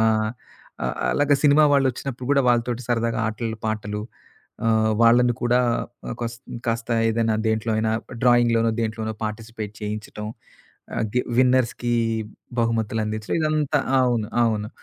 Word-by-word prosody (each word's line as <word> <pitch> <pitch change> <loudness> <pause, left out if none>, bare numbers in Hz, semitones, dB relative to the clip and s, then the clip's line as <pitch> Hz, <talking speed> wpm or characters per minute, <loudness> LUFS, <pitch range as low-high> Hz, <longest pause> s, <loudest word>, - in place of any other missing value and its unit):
ఆహ్, 110 -1 +2 0.5
ఆహ్, 60 - -1 0.2
అలాగా 145 0 +3
సినిమా 150 +1 +6
వాళ్ళొచ్చినప్పుడు 130 -2 -1
కూడా 140 - +4
వాళ్ళతోటి 120 0 +1
సరదాగా 115 0 0
ఆటలు, 110 0 -4
పాటలు, 105 -1 -3 0.7
ఆహ్, 110 -1 +3
వాళ్ళని 120 +1 +5
కూడా 120 +1 +3 0.5
ఆహ్, - - -3
కోస్ 115 0 -3 0.3
కాస్త 115 0 -2 0.2
ఏదైనా 115 -1 +1
దేంట్లో 110 +1 0
అయినా 110 0 +1
డ్రాయింగ్‌ 120 0 -11
డ్రాయింగ్‌లోనో, 115 -2 +4
దేంట్లోనో 110 0 -3
పార్టిసిపేట్ 110 -1 -6
చేయించటం. 105 0 -5 0.7
ఆహ్, 115 - 0
గి 125 - +3 0.2
విన్నర్స్‌కి 125 -1 +2 0.7
బహుమతులందించడం, 110 -2 -1
ఇదంతా 155 -1 +1 0.2
అవును. 120 -4 +1
అవును. 110 -2 0
115 Hz, 125 wpm, -23 LUFS, 110-125 Hz, 0.7 s, సినిమా